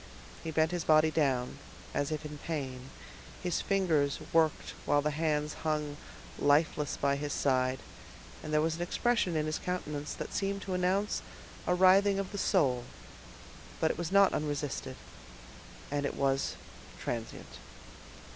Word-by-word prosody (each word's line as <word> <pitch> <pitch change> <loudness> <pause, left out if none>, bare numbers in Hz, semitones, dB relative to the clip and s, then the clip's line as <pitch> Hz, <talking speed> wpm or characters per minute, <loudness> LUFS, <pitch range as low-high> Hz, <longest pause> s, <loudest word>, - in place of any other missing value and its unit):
He 165 - -4
bent 160 +1 +2
his 175 -2 -2
body 155 0 +5
down, 135 -5 0 0.3
as 145 +2 -1
if 155 0 -3
in 150 -1 -7
pain, 135 -5 -4 0.5
his 180 -1 0
fingers 165 -8 +2 0.2
worked 160 -2 +2
while 145 0 +2
the 150 - +1
hands 150 -1 0
hung 150 -2 -1 0.4
lifeless 145 0 +2
by 140 0 +1
his 145 0 -3
side, 130 -2 +1 0.6
and 155 - -6
there 150 0 +3
was 160 +1 0
an - - -5
expression 185 0 +1
in 155 -1 +1
his 155 0 -2
countenance 150 -5 -3
that - - -6
seemed 200 0 -1
to 190 - -3
announce 185 +3 +1 0.5
a 180 - +3
writhing 195 +2 +5
of 195 -1 -3
the 200 - -4
soul; 135 - +2 1.0
but 160 - +3
it - - -6
was 170 0 -3
not 200 0 +6
unresisted, 145 -3 -2 1.0
and 145 0 0
it 140 - -2
was 135 0 +1 0.4
transient. 115 -2 -5
155 Hz, 150 wpm, -31 LUFS, 145-180 Hz, 1.0 s, not